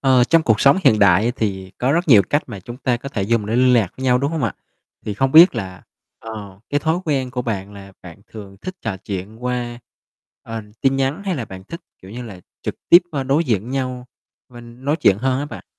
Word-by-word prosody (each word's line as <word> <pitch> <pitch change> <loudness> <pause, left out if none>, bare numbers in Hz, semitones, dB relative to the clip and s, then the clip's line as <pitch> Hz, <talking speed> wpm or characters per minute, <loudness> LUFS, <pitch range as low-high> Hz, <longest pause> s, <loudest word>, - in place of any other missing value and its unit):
Ờ, 130 -2 +4
trong 165 +5 +3
cuộc 110 -6 +2
sống 140 +6 +5
hiện 110 - +5
đại 100 +1 +5
á 120 - +2
thì 95 -3 -3
có 130 +3 +1
rất 170 +2 0
nhiều 110 -7 +8
cách 145 - +2
mà 105 -6 -8
chúng 120 +6 -9
ta 125 -2 0
có 130 +3 -8
thể 105 -7 -3
dùng 105 +1 0
để 110 +2 -1
liên 125 0 +4
lạc 110 -7 +3
với 130 - -6
nhau, 125 -1 +3
đúng 140 +3 -1
không 160 -3 -3
ạ? - - -2 0.5
Thì 105 - -3
không 135 +4 0
biết 165 -1 +8
là, 95 -5 -6 0.4
ờ, 105 -4 -9
cái 145 0 +1
thói 160 +3 +1
quen 135 -5 -1
của 125 0 -3
bạn 100 -4 -4
là 100 -1 -12
bạn 90 +1 -12
thường 100 -3 -11
thích 185 - -6
trò 110 -4 -3
chuyện 100 +4 -7
qua, 120 -1 -3 0.6
ờ, 115 0 -6 0.2
tin 135 0 +2
nhắn 135 +7 -1
hay 190 -2 -1
là 125 - -3
bạn 95 -3 -11
thích, 170 - -8 0.2
kiểu, 95 - -12
như 120 +4 -7
là 100 -6 -10 0.2
trực - - -3
tiếp, 175 +2 +8
ơ, 140 -4 -2
đối 140 +5 +1
diện 115 - -1
nhau 130 -2 -3 0.4
mình 120 +1 -13
nói 145 +2 +1
chuyện 100 0 +4
hơn 130 +1 0
á 145 - -2
bạn? - - -10
120 Hz, 245 wpm, -20 LUFS, 105-135 Hz, 0.6 s, nhiều